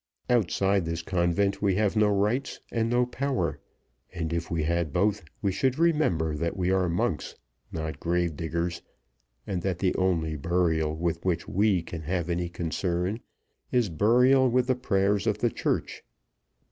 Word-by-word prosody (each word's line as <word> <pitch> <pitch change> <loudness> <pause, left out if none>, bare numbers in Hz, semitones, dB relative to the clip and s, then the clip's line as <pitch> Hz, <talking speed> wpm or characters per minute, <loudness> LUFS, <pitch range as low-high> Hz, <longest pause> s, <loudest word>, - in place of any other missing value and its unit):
Outside 100 -4 +2
this 85 +1 -3
convent 100 +3 0
we 100 -3 +2
have 105 +1 +1
no 105 -1 +4
rights 105 +6 0
and 115 -1 0
no 120 +1 +3
power; 120 - -2 0.5
and, 85 -3 -3
if 85 0 -2
we 80 -2 -1
had 85 -1 0
both, 100 +3 +1 0.2
we 100 - +2
should 130 +7 0
remember 150 - +2
that 85 +5 -2
we 90 0 +1
are 95 -2 +2
monks, 85 +2 -1 0.4
not 80 -1 -4
grave 85 -1 0
diggers, 85 +2 -3 0.6
and 90 -3 -2
that 95 -1 -1
the 95 0 +1
only 85 -4 +1
burial 80 0 0
with 85 +1 -2
which 85 -3 -1
we 100 -3 +2
can 85 -1 -7
have 85 +2 -2
any 85 0 -1
concern 90 +4 -2 0.5
is 120 -5 +2
burial 125 - +4
with 125 +1 +2
the 130 0 +1
prayers 100 -3 +1
of 105 -2 +1
the 120 +1 +1
Church. - - -2
90 Hz, 160 wpm, -27 LUFS, 85-105 Hz, 0.6 s, no